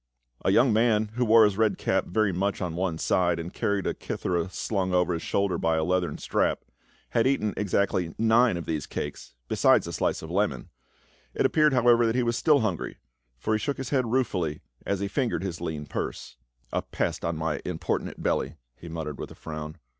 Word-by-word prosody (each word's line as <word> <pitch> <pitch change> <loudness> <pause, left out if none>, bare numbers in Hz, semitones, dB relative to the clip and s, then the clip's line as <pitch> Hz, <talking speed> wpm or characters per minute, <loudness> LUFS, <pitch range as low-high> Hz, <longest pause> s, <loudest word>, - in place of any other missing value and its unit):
A - - +2
young 125 -2 +4
man 110 -1 +3
who 125 +2 0
wore 115 -1 +7
his 100 -1 0
red 110 -2 +3
cap - - 0
very 105 +2 +1
much 100 +3 -1
on 90 -3 -3
one 90 -2 -1
side, 85 0 +1
and 85 +1 -6
carried 100 -1 -1
a - - 0
kithera 85 0 -2
slung 95 -2 -1
over 90 0 +2
his 85 - -3
shoulder 100 -2 0
by 80 0 +1
a 80 - +1
leathern 90 +1 0
strap, - - 0 0.5
had 115 +1 +3
eaten 110 -6 +1
exactly 95 -4 0
nine 115 -2 +4
of 85 - -5
these 75 -3 -3
cakes 75 -4 -6
besides - - +4
a - - -6
slice - - -1
of 80 - -7
melon; 90 -10 -1 0.7
it - - +1
appeared 150 -2 +4
however 120 -2 +5
that 115 - 0
he 125 - +2
was 120 0 0
still 150 +1 +4
hungry, 95 -7 -2 0.4
for 85 - -1
he 110 - +2
shook 140 +5 -2
his 135 -3 -5
head 130 -4 +2
ruefully 95 - 0 0.3
as 100 -1 0
he 100 - 0
fingered 115 - -1
his 85 -3 -4
lean 80 -3 -4
purse. - - -4
S30 - - -29
PA - - -5
UL. - - +3
"A - - -3
pest - - -3
on 85 -1 -1
my 80 -1 -2
importunate - - -3
belly," 70 +5 0 0.2
he 85 - -11
muttered 80 -3 -5
with - - -5
a - - -12
frown. 75 0 -7
95 Hz, 215 wpm, -27 LUFS, 80-115 Hz, 0.7 s, wore